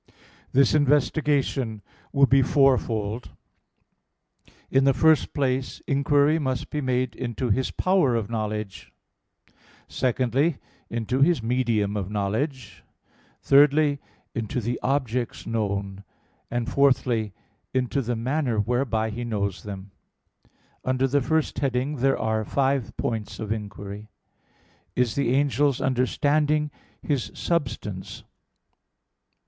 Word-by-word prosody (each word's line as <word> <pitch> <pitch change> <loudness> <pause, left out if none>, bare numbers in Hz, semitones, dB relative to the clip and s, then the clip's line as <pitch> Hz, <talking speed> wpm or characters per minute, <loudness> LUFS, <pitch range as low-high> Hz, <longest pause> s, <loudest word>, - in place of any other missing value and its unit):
This 135 -1 +4
investigation 145 -5 +1 0.3
will 140 -1 +5
be 135 0 +4
fourfold. 125 -5 +1 1.4
In 135 0 +4
the 135 0 +4
first 160 -3 +4
place 130 -2 -1
inquiry 145 +3 +3
must 130 -4 -2
be 150 - -2
made 130 -2 0
into 120 -1 -2
his 130 +5 +1
power 185 -10 +2
of 110 -3 -1
knowledge: 110 -3 -4 1.0
secondly, 130 +4 +1 0.3
into 115 +3 -1
his 150 -5 +3
medium 115 -4 0
of 100 -3 -3
knowledge: 110 - -3 0.6
thirdly, 145 +1 +5 0.3
into 115 +3 -2
the 120 +1 -2
objects 125 -3 -1
known: 100 -3 -2 0.5
and 120 0 -2
fourthly, 125 -5 +2 0.4
into 130 +2 0
the 120 -1 -2
manner 125 +1 -1
whereby 110 0 0
he 120 +3 -5
knows 100 -5 -2
them. 100 -1 -8 0.9
Under 130 +1 +1
the 140 +2 +2
first 160 +3 0
heading 135 +2 -1
there 135 +2 +2
are 110 0 0
five 135 0 0
points 110 -3 -3
of 110 -1 -4
inquiry: 105 -1 -6 0.9
(1) 125 - +4
Is 120 - -3
the 130 -3 +1
angel's 140 -1 +2
understanding 145 +4 +1 0.3
his 140 -5 -1
substance? 120 - -3
125 Hz, 110 wpm, -25 LUFS, 110-140 Hz, 1.4 s, will